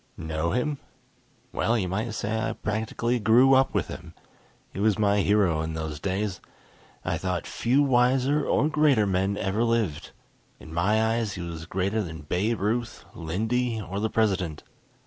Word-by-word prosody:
Know 80 +1 -2
him? 135 - -1 0.7
Well 115 +1 +1
you 95 -4 -1
might 105 +5 -3
say 110 +1 -2
I 110 0 -1
practically 110 +3 -2
grew 120 +5 +5
up 135 0 +3
with - - +1
him. - - -9 0.6
He - - -6
was 105 0 +2
my 105 -1 +2
hero 95 -6 +2
in 80 0 -4
those 80 -2 -4
days. 95 +2 -2 0.6
I - - -1
thought 90 -2 -2
few 130 +5 +1
wiser 130 +2 +3
or 150 - +2
greater 150 -8 +3
men 95 +1 0
ever 100 +4 0
lived. 115 -9 0 0.5
In 80 - -11
my 110 +6 +2
eyes 110 -4 -2
he 90 - -5
was 80 -1 -7
greater 95 +4 -1
than 80 -4 -6
Babe 100 +9 -1
Ruth, 115 +3 -2
Lindy, 110 +8 -1
or 100 -1 -5
the 110 +1 0
President. 95 -9 0
105 Hz, 165 wpm, -26 LUFS, 90-115 Hz, 0.7 s, grew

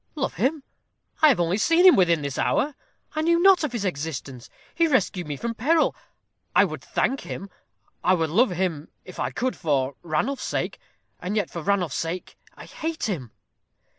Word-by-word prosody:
"Love 280 - -2
him! 270 - 0 0.6
I 310 - +8
have 255 - +3
only 175 +4 +1
seen 335 - +4
him 370 - +9
within 170 -5 +3
this 140 -1 -3
hour. 295 +2 +1 0.4
I 310 - 0
knew 335 +1 +3
not 380 -1 +6
of 300 - -1
his 230 -4 -3
existence. 140 -6 -5 0.2
He 335 -1 +3
rescued 190 - 0
me 145 -2 -4
from 235 +7 -3
peril. 310 +8 +2 0.6
I - - +7
would - - -6
thank 270 - 0
him. 195 0 -7 0.5
I 185 +1 +4
would 160 -3 -1
love 230 +8 +4
him, 175 -4 -2 0.2
if 180 - -11
I - - 0
could, 255 +1 -2
for 140 -5 0
Ranulph's 175 - -1
sake; - - -3 0.4
and 185 +4 -3
yet 205 -5 -1
for 170 - -5
Ranulph's 180 -4 0
sake 170 +2 -4 0.2
I - - -11
hate 320 0 -5
him." 155 - -3
190 Hz, 185 wpm, -25 LUFS, -, 0.6 s, him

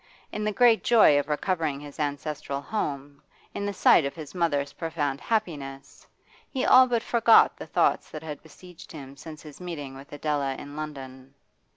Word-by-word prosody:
In 210 - -4
the 215 - 0
great 230 +2 +4
joy 215 -11 +5
of 145 - -3
recovering 155 -2 -1
his 145 0 -11
ancestral 145 -1 -3
home, 140 -5 -4 0.3
in 200 - -3
the - - -1
sight 180 - +5
of 140 - -4
his 155 -3 -9
mother's 145 -5 -1
profound 150 -4 -3
happiness, 145 -11 -4 0.4
he 265 -2 -2
all 255 0 +7
but 235 -2 0
forgot 230 -1 +5
the - - -9
thoughts - - +1
that 155 0 -8
had 150 -3 -7
besieged 175 +2 -15
him 140 -3 -10
since 155 +1 -11
his 150 +2 -12
meetings 145 -7 -7
with 135 +1 -13
Adela 145 -2 -2
in 145 +2 -10
London. 135 -3 -8
150 Hz, 175 wpm, -26 LUFS, 140-180 Hz, 0.4 s, all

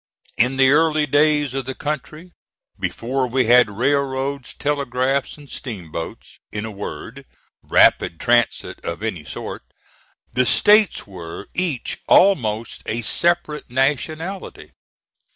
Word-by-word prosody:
In 125 +3 +2
the 135 0 +5
early 155 0 +3
days 145 -1 +2
of 135 -1 -3
the 130 0 -5
country, 155 +3 -5 0.5
before 130 +2 -2
we 125 +1 +1
had 120 -1 +6
railroads, 135 +3 -1
telegraphs 140 -1 -1
and 145 -1 -14
steamboats 85 - -7
in 105 0 -4
a 110 - -6
word, 105 +5 -8 0.4
rapid 85 - +3
transit 120 -2 +1
of 85 +5 -5
any 95 -9 -3
sort - - -7 0.7
the 125 0 +2
States 210 -1 +4
were 90 -4 -9
each 170 -9 -2
almost 115 - +3
a 115 +1 -2
separate 170 +3 0
nationality. 155 +8 -2
130 Hz, 115 wpm, -21 LUFS, 115-150 Hz, 0.7 s, had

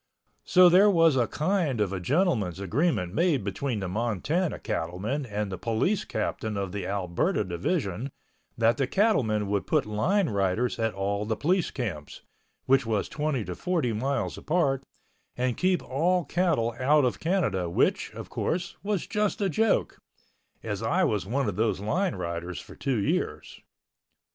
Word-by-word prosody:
So 180 0 +7
there 190 +4 +6
was 165 -6 +4
a 120 -3 +2
kind 155 - 0
of 100 -2 0
a 95 - -2
gentleman's 110 - +1
agreement 100 - 0
made 165 - +2
between 105 +3 -2
the 95 - -2
Montana 120 - -1
cattlemen 105 - -3
and 105 -2 -3
the 95 - -5
police 120 - 0
captain 110 -2 -3
of 100 -2 -3
the 100 -2 -4
Alberta 100 - 0
Division 100 - -2 0.5
that 115 0 +3
the 135 - +1
cattlemen 125 - +2
would 100 0 -1
put 155 -4 +2
line 160 - +1
riders 100 +5 0
at 115 -3 0
all 100 +1 -1
the 110 +1 -1
police 180 - +1
camps, 95 - -5 0.4
which 135 +1 +4
was 110 -3 -1
twenty 150 -6 -2
to - - -4
forty 165 -10 -1
miles 135 +6 -2
apart, 140 -5 +1 0.5
and 125 -1 0
keep 185 0 +1
all 170 +5 +1
cattle 150 -9 +1
out 145 +2 +4
of 125 - -1
Canada 155 - 0
which, 85 - +1
of - - -7
course, 175 +1 -3
was 200 -2 -1
just 210 +2 -1
a 200 -2 +1
joke, 220 +7 +1 0.6
as 105 -2 -3
I 175 +12 +1
was 105 - 0
one 135 +3 0
of 100 -2 -3
those 110 -3 +1
line 170 - 0
riders 85 0 -4
for - - -12
two 135 -4 -1
years. 100 - -2
125 Hz, 165 wpm, -27 LUFS, 100-170 Hz, 0.6 s, So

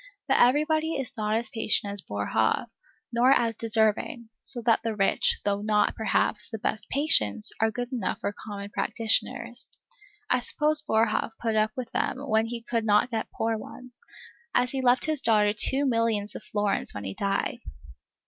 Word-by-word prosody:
But - - +3
everybody 310 +5 +3
is 265 -4 -3
not 215 -1 -1
as 230 +1 -1
patient 215 -4 0
as 200 - -1
Boerhaave, 110 - -1 0.4
nor 240 +2 +4
as 235 -4 +3
deserving; 225 +3 0
so 250 - 0
that 230 -1 +3
the 225 -1 -2
rich, 195 -1 +2
though 205 0 0
not, 210 0 +2
perhaps, 210 -1 0
the 225 - -5
best 215 0 -3
patients, 105 - +3
are 225 - +4
good 245 +3 -5
enough 245 - -2
for 205 - -3
common 200 -1 -8
practitioners. 230 +3 -1 0.5
I 250 - +2
suppose 300 +4 +1
Boerhaave 225 -3 0
put 225 -2 -1
up 215 0 +1
with 250 -2 -5
them - - -1
when 220 -2 +2
he 230 0 -6
could 230 -1 -1
not 210 +3 +3
get 225 -1 -3
poor 225 0 -2
ones, 250 +2 -12 0.6
as 250 0 +2
he 270 - -2
left 250 0 +3
his 310 -3 0
daughter 210 -2 +3
two 270 +6 +2
millions 230 -4 0
of - - -7
florins 205 -1 -1
when 105 - -5
he 95 -1 -4
died. 200 - -1
225 Hz, 175 wpm, -27 LUFS, 210-245 Hz, 0.6 s, nor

